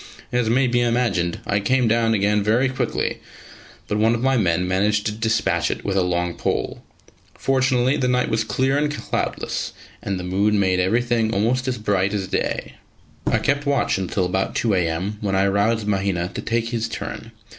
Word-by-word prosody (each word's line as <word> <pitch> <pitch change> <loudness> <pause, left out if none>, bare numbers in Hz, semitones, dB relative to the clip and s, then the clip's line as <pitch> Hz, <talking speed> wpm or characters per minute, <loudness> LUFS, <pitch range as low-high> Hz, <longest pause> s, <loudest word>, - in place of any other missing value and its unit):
As 120 -2 +1
may 130 +3 +3
be 120 -1 +2
imagined, 115 -8 0
I 100 - +1
came 125 +4 +2
down 115 0 +2
again 105 +1 +2
very 115 +6 +2
quickly, 130 - -2 0.7
but 105 - -1
one 115 +2 +3
of 120 - -4
my 135 0 +3
men 90 -5 +1
managed 105 +3 +1
to 105 - 0
despatch 110 +1 0
it - - -4
with 100 - -1
a 95 - +3
long 90 -1 0
pole. - - -2 0.6
Fortunately 130 0 +2
the 125 - 0
night 125 0 +2
was 110 0 0
clear 130 +6 +1
and 150 0 0
cloudless, 150 - -3 0.3
and 95 -1 -3
the - - -5
moon 100 +3 +1
made 95 -2 +2
every 95 +7 +2
thing 115 -2 +1
almost 120 +5 0
as 130 - -1
bright 100 -1 0
as 95 -2 -2
day. - - -2 0.5
I - - +3
kept 145 0 0
watch 140 -8 +1
until 95 0 -1
about 95 +2 -1
2 110 -2 +1
a.m., 90 +3 -1
when 100 -2 -1
I 95 +1 +3
roused 100 +3 +1
Mahina 95 -3 0
to - - -4
take 115 0 -1
his 115 -1 -2
turn. - - -6
105 Hz, 190 wpm, -22 LUFS, 95-120 Hz, 0.7 s, may